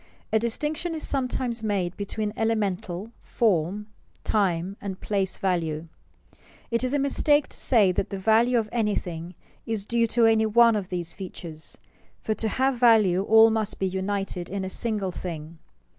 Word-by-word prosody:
_ - - -28 0.3
A 220 - +5
distinction 300 +9 -2
is 315 - -3
sometimes 255 -3 -1
made 195 -5 -1
between 210 +1 -3
elemental, 205 -3 -2
form, 200 -2 0 0.4
time, 190 -3 0
and 195 -2 -5
place 195 -2 -1
value. 165 -4 -1 0.8
It 235 +1 +1
is 255 - 0
a - - +3
mistake 290 +1 +2
to - - -9
say 215 -7 +4
that 180 - -2
the 195 - -4
value 225 +5 +3
of 220 -2 0
anything 180 -7 -2 0.3
is 220 -3 -2
due 235 +1 +1
to 230 +1 +3
any 220 -1 +4
one 230 +1 +5
of 200 -3 -3
these 175 -2 -3
features, 170 -4 -8 0.4
for 220 - -1
to 220 - -2
have 260 +2 0
value 215 -7 +5
all 220 +2 +6
must 220 -1 -1
be 195 - -1
united 190 -1 -3
in 195 0 -3
a 190 - -5
single 210 -5 -1
thing. 165 -2 -7
210 Hz, 165 wpm, -25 LUFS, 185-230 Hz, 0.8 s, all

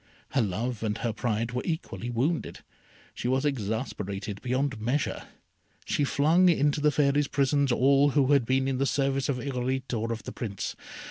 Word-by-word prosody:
Her 135 - +1
love 110 +3 -2
and 105 -1 -1
her 115 -1 -2
pride 115 +1 -1
were 125 +1 -2
equally 120 - -4
wounded. 135 +8 -1 0.5
She - - -4
was 130 +3 +1
exasperated 105 -5 -3
beyond 130 -2 -1
measure. 130 +6 -1 0.6
She 145 - +1
flung 165 +7 +4
into 150 -3 +2
the 150 - +5
Fairy's 145 0 +2
prisons 140 -1 +1
all 140 +3 +4
who 140 -1 +2
had 140 -3 +5
been 130 +3 +1
in 130 -1 -1
the 135 - +2
service 135 -1 0
of 135 - 0
Irolite 130 0 -2
or 115 0 -1
of 115 -1 -4
the - - -6
Prince. 100 -5 -4
130 Hz, 175 wpm, -28 LUFS, 115-140 Hz, 0.6 s, the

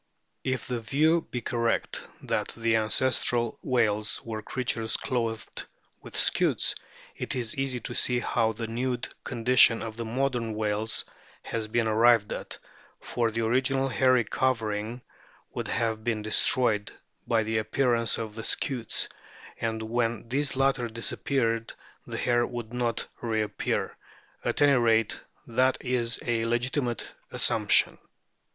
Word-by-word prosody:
If 130 -2 -2
the 125 -2 -2
view 155 +9 +2
be 125 - -3
correct 115 0 -1 0.2
that - - -2
the 115 -1 +2
ancestral 120 +1 +1
whales 110 -4 +1
were 110 -1 -4
creatures 115 -1 -1
clothed 115 -4 -3 0.4
with - - -11
scutes, - - +2 0.4
it - - -3
is 120 -3 -2
easy 135 -2 -1
to - - -5
see 125 - +1
how 115 -2 +1
the 115 +1 -4
nude 125 +2 -2 0.2
condition 120 -1 +4
of 110 -1 -6
the 115 - -3
modern 120 -2 -1
whales 105 +1 0 0.4
has 110 -1 -3
been 115 +1 +1
arrived 110 -1 +4
at, - - -6 0.4
for 120 -2 -1
the 115 +1 -1
original 135 +3 +2
hairy 130 -1 +3
covering 115 -1 -1 0.5
would - - -4
have 115 -1 -1
been 110 -2 -1
destroyed 110 -1 +3 0.4
by 115 -2 +2
the 110 0 0
appearance 115 0 +1
of 110 -2 -5
the 110 0 -7
scutes, 120 -2 0 0.5
and 110 -1 -2
when 115 0 -1
these 140 +1 0
latter 135 -2 +2
disappeared 115 0 -1 0.3
the - - -5
hair 120 0 +2
would 120 -2 -6
not 120 -2 -1 0.2
reappear 110 -3 -1 0.5
at - - +1
any 145 -1 +6
rate, 115 -2 +2 0.2
that 130 +3 +2
is 120 -2 0
a 115 -2 0
legitimate 120 +1 -1 0.2
assumption. - - +3
115 Hz, 135 wpm, -27 LUFS, 110-125 Hz, 0.5 s, any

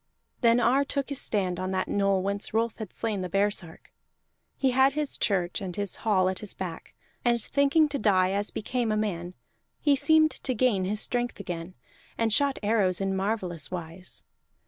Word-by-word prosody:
Then 235 -1 +4
Ar 250 +4 +3
took 280 0 -3
his 280 - -1
stand 185 -4 -1
on 185 0 -2
that 185 - -1
knoll 195 -2 +1
whence 200 +2 -3
Rolf 230 0 +1
had 215 -5 -7
slain 215 -4 -2
the 180 - -4
baresark; 195 -3 -1 0.7
he 265 -2 +2
had 265 +2 +4
his 300 -1 -1
church 180 -3 0
and 185 -3 -5
his 200 -2 -1
hall 195 -4 +2
at 185 0 -1
his 210 - -8
back, 175 -3 -7 0.3
and 240 -1 +3
thinking 280 +6 +3
to 280 -1 -3
die 185 -3 +3
as 200 +1 0
became 235 +1 -2
a 215 - +1
man 180 -4 -3 0.4
he 290 -2 +3
seemed 315 +2 +5
to 255 - -3
gain 215 -6 +2
his 210 +3 0
strength 245 -2 -2
again, 175 -1 -6 0.4
and 225 -2 +1
shot 280 +3 +2
arrows 205 -4 +2
in 195 -1 -1
marvellous 190 -4 -2
wise. 175 0 -7
205 Hz, 185 wpm, -27 LUFS, 185-245 Hz, 0.7 s, seemed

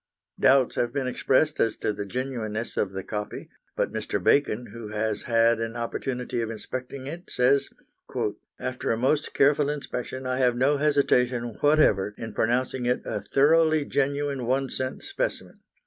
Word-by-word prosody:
Doubts 130 -2 +4
have 120 -1 +1
been 135 0 -2
expressed 135 +4 +1
as 115 - +2
to 105 - -2
the 100 0 -5
genuineness 120 -2 -3
of 95 - 0
the 95 0 -5
copy, 105 -1 -5 0.2
but - - 0
Mr. - - -2
Bacon, 125 -4 +2
who 115 -2 -7
has 105 0 -2
had 115 -1 +3
an 115 0 -3
opportunity 125 +1 -3
of 115 - -2
inspecting 130 +4 -6
it, 170 +6 -7
says: 135 +3 +2 0.9
"After 130 -1 -3
a 115 - +2
most 140 +5 0
careful 145 +1 +4
inspection 130 -3 -4
I 130 0 -1
have 125 -2 +3
no 140 +3 +3
hesitation 125 -5 +2
whatever 125 -10 +3
in 115 -2 -6
pronouncing 125 +2 0
it 125 - +1
a - - -3
thoroughly 155 +1 +3
genuine 140 -2 -1
one 135 +1 0
cent 130 0 -4
specimen. - - -4
130 Hz, 160 wpm, -26 LUFS, 115-140 Hz, 0.9 s, Doubts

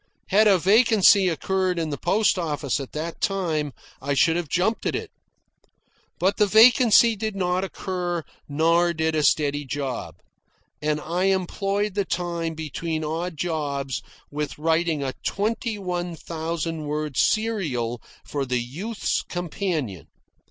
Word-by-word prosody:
Had 215 +2 +5
a 195 -2 +6
vacancy 200 0 +5
occurred 185 +2 0
in 160 -2 -2
the - - -1
post 200 +1 +2
office 145 -4 -1
at 135 - -7
that 160 +2 -5
time, 165 -7 0 0.3
I 140 +1 -1
should 160 +5 +4
have 170 -4 -2
jumped 190 +6 0
at - - 0
it. - - -5 1.1
But 190 +3 +1
the 210 - +4
vacancy 230 +1 +6
did 215 0 -3
not 180 -1 0
occur, 180 -3 -3 0.3
nor 165 +4 +3
did 160 0 0
a 155 - +1
steady 145 -1 +2
job; 135 -2 -4 0.7
and 150 0 0
I 175 +4 -1
employed 195 +2 0
the 200 +1 +1
time 170 -2 -3
between 160 +1 -3
odd 165 +2 -3
jobs 140 -5 -2 0.3
with 150 0 -4
writing 160 -1 +1
a 130 -1 -2
twenty 220 +2 -1
one 180 -3 -3
thousand 165 0 -4
word 150 -1 -3
serial 135 - 0 0.2
for 145 -1 -2
the 125 -1 -1
"Youth's 180 - -2
Companion." 165 - -3
170 Hz, 140 wpm, -24 LUFS, 150-195 Hz, 1.1 s, a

